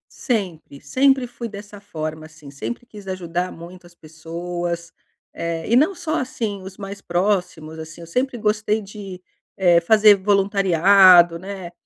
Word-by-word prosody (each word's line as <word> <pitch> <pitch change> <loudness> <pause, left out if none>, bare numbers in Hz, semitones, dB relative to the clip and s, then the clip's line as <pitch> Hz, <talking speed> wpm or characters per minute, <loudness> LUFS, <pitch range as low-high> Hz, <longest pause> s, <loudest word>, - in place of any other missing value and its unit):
Sempre, 180 - -3
sempre 270 -1 +2
fui 235 -1 -7
dessa 205 0 -10
forma, 155 -5 -6
assim, 155 -2 -14
sempre 240 - -6
quis 205 -4 -13
ajudar 180 -1 -3
muito 175 +1 -12
as 175 - -21
pessoas, 170 +1 -6 0.4
eh, 170 +2 -4
e 240 - +5
não 320 +8 +3
só 330 -2 -3
assim, 220 -6 -4
os 190 0 -10
mais 200 0 -8
próximos, 175 -4 -2
assim, 160 +1 -10
eu 170 - -10
sempre 250 +6 -1
gostei 215 0 0
de, 195 -2 -10 0.3
eh, 175 -3 +4
fazer 210 +4 +6
voluntariado, 190 -3 +5
né, 190 -2 -8
190 Hz, 145 wpm, -21 LUFS, 170-210 Hz, 0.4 s, fazer